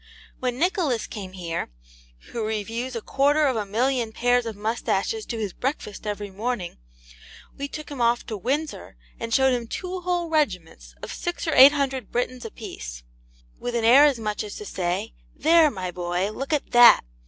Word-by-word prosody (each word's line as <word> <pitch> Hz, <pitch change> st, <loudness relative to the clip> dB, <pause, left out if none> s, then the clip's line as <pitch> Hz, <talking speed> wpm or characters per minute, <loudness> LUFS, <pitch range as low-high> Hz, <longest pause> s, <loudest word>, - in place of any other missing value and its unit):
When 250 Hz, -1 st, -2 dB
Nicholas 330 Hz, -, +1 dB
came 190 Hz, -3 st, -8 dB
here, 170 Hz, -, -4 dB, 0.6 s
who 230 Hz, -, -3 dB
reviews 225 Hz, +4 st, -3 dB
a 230 Hz, -, -4 dB
quarter 290 Hz, +3 st, +2 dB
of 265 Hz, -3 st, +1 dB
a 210 Hz, -2 st, -2 dB
million 240 Hz, +2 st, 0 dB
of 220 Hz, -, -20 dB
pairs 245 Hz, 0 st, +2 dB
of 225 Hz, -, -5 dB
moustaches 225 Hz, -, -1 dB
to 235 Hz, -, -4 dB
his 210 Hz, -5 st, -3 dB
breakfast 245 Hz, -6 st, -4 dB
every 205 Hz, -1 st, -4 dB
morning, 205 Hz, -3 st, -4 dB, 0.8 s
we 280 Hz, -, -4 dB
took 305 Hz, +1 st, -8 dB
him 275 Hz, -4 st, -5 dB
off 235 Hz, +1 st, +2 dB
to 220 Hz, -, -5 dB
Windsor 280 Hz, -, -3 dB, 0.2 s
and 230 Hz, 0 st, -5 dB
showed 265 Hz, +2 st, +4 dB
him 240 Hz, -2 st, -2 dB
two 365 Hz, +7 st, -5 dB
whole 355 Hz, -1 st, -1 dB
regiments 180 Hz, -, -2 dB
of -, -, -5 dB
six 350 Hz, 0 st, -4 dB
or 320 Hz, -, +1 dB
eight 275 Hz, +2 st, +9 dB
hundred 270 Hz, -3 st, -2 dB
Britons 245 Hz, 0 st, -2 dB
a -, -, -4 dB
piece, -, -, -8 dB, 0.6 s
with 245 Hz, -1 st, -4 dB
an 230 Hz, -1 st, +1 dB
air 265 Hz, +6 st, +8 dB
as 285 Hz, -4 st, +3 dB
much 215 Hz, -2 st, -3 dB
as 210 Hz, -1 st, -7 dB
to 210 Hz, -, -8 dB
say, 185 Hz, +4 st, -2 dB, 0.2 s
'There, 320 Hz, +1 st, +5 dB
my 185 Hz, -7 st, -5 dB
boy, 180 Hz, +3 st, -2 dB
look 270 Hz, +7 st, -5 dB
at 300 Hz, -2 st, -1 dB
THAT. 240 Hz, 0 st, +8 dB
235 Hz, 190 wpm, -24 LUFS, 210-275 Hz, 0.8 s, eight